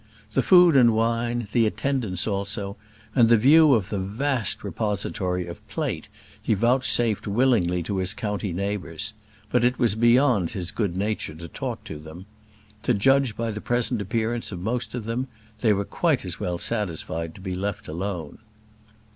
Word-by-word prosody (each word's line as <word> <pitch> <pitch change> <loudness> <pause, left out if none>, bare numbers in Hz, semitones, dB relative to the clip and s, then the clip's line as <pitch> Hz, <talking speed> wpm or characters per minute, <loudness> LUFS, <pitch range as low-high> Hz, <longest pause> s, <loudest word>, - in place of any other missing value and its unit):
The - - +2
food 180 -4 +6
and 120 -4 +6
wine, 115 +1 0
the 115 -1 +3
attendance 110 -6 -1
also, 100 0 -3 0.4
and 115 -3 +5
the 115 - +7
view 145 +4 +6
of 105 -3 -1
the 100 - -2
vast 115 +4 -1
repository 95 -4 -2
of 85 0 -10
plate - - -3 0.3
he 110 - +1
vouchsafed 120 -1 +1
willingly 100 -6 +2
to 100 +4 -3
his 95 +1 -1
county 105 -2 -3
neighbours; 95 -3 -3 0.4
but 125 -1 +3
it 125 +1 +2
was 120 -5 +2
beyond 120 - +3
his 95 -5 -4
good 100 -6 -2
nature 105 -5 -2
to 85 +1 -8
talk - - -5
to 75 - -8
them. 80 +4 -11 0.6
To - - +1
judge 135 +1 +3
by 115 -1 -1
the 105 0 -6
present 120 -2 +1
appearance 115 +4 -2
of 90 - -5
most 115 +7 -3
of 120 -4 -5
them, 120 +4 -2 0.3
they 110 -2 +3
were 100 -1 +1
quite - - 0
as - - -4
well 90 -1 -2
satisfied 85 -6 -3
to - - -12
be 95 -1 -4
left 100 +1 -4
alone. 85 -1 -5
105 Hz, 170 wpm, -25 LUFS, 95-120 Hz, 0.6 s, the